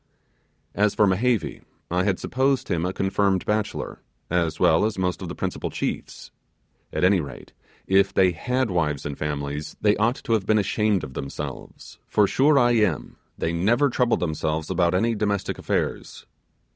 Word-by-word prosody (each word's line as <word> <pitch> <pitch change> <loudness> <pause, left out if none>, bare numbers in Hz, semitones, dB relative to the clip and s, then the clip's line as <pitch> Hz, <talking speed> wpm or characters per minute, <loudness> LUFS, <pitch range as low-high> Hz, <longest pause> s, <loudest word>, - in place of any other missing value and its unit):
As 105 0 +1
for 105 - +4
Mehevi, 110 +4 0 0.3
I 90 +1 +1
had 95 -3 +1
supposed 135 +1 0
him 85 +1 0
a - - -1
confirmed 95 0 0
bachelor, 105 0 -2 0.3
as 85 -3 0
well 80 +4 +4
as 110 -2 -1
most 90 -1 -1
of - - -5
the - - -6
principal - - -3
chiefs. - - -5 0.6
At - - -2
any 95 +1 +5
rate, 70 - -10 0.3
if 95 +1 +3
they 95 -1 +4
had 125 +7 -1
wives 75 -5 -1
and 70 -1 -3
families, 75 0 -4
they 105 -1 +3
ought 115 +4 +2
to 115 - 0
have 105 -3 0
been 110 - +4
ashamed 105 -1 +1
of 65 - -7
themselves; 70 - -7
for 105 - +3
sure 140 +8 +3
I 120 -2 +4
am, 105 - 0 0.2
they 80 - -1
never 120 +11 +2
troubled 125 -1 +1
themselves 80 -1 -2
about 90 -1 +2
any 115 +5 +2
domestic 105 -2 -1
affairs. - - -3
95 Hz, 170 wpm, -24 LUFS, 85-110 Hz, 0.6 s, any